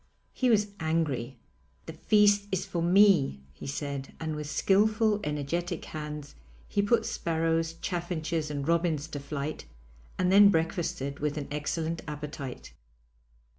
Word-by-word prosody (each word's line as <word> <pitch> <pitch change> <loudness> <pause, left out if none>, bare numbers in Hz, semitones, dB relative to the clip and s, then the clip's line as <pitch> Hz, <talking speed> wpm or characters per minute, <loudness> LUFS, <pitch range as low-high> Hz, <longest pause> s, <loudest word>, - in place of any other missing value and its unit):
He 255 - +1
was 210 -2 +3
angry: 150 -6 -1 0.5
'The - - -7
feast 205 -1 +3
is 190 -1 -1
for 170 - -3
me,' 175 - +5
he 65 - -9
said, 140 -1 -4
and 160 -1 -3
with 150 -1 -5
skilful, 215 +4 +3
energetic 160 +4 -2
hands 150 -1 -6 0.3
he 200 - +1
put 215 +4 +2
sparrows, 165 0 0
chaffinches, 170 -3 -2
and 145 -1 -3
robins 165 -3 +1
to 145 - -5
flight 140 +1 -5 0.5
and 180 0 +2
then 200 +1 +8
breakfasted 160 -5 -1
with 150 +1 -1
an 145 - -4
excellent 160 +2 -2
appetite. 145 -3 -7
160 Hz, 135 wpm, -29 LUFS, 145-185 Hz, 0.5 s, then